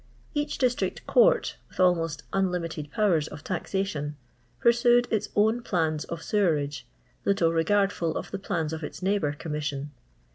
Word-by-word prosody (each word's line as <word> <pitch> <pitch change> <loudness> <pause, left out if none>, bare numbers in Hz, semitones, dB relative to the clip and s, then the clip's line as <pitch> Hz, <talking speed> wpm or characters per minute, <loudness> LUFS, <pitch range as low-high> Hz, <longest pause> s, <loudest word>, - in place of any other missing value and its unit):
Bach 295 -1 0
district 250 -2 0
court - - +4
— - - -35
with - - -17
almost 165 -4 +2
un* 195 0 +3
liinited 165 -4 -4
powers 170 -4 +2
of 150 0 -10
taxation 175 -5 -2 0.2
— 120 0 -37
pursaed 240 +1 +4
its 210 -1 0
own 220 +3 +3
plans 160 -8 0
of 165 -1 -6
sewerage, 150 - 0 0.4
little 170 -4 +2
regardful 170 -1 +1
of - - -6
the 195 - -3
plans 165 -5 -2
of 160 0 -5
its 165 - -7
neighbour 190 -7 +1
Commiasion. 150 -2 -3
175 Hz, 155 wpm, -27 LUFS, 150-205 Hz, 0.4 s, court